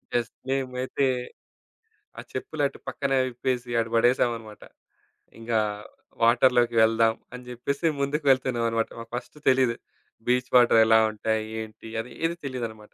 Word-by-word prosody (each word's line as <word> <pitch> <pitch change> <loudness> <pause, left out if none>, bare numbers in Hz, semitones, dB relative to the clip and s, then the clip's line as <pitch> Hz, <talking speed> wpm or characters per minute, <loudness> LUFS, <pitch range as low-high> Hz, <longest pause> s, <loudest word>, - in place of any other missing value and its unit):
Yes! 120 -1 0 0.2
మేమైతే 130 0 -1 1.1
ఆ - - -5
చెప్పులు, 155 -2 -4
అటు - - -13
పక్కనే 140 -3 -1
విప్పేసి 125 0 -3
అటు 115 0 -1
బడేసామన్నమాట. 115 -2 +1 0.8
ఇంగా 115 -1 0 0.6
వాటర్‌లోకి 120 0 +4
వెళ్దాం 115 0 +3 0.2
అని 125 0 -8
జెప్పేసి. 140 +6 -3 0.2
ముందుకు 145 +2 -1
వెళ్తున్నామన్నమాట. 120 -3 +1
మాకు 115 0 -10
ఫస్టు 125 +4 -7
తెలీదు. 130 -3 +3 0.5
బీచ్ 125 0 +1
వాటరెలా 110 -2 +6
ఉంటాయి? 110 0 -1 0.2
ఏంటి? 110 +1 -10
అది 125 - -6
ఏది 170 +1 0
తెలియదన్నమాట. 115 -5 -6
120 Hz, 120 wpm, -26 LUFS, 115-130 Hz, 1.1 s, వాటరెలా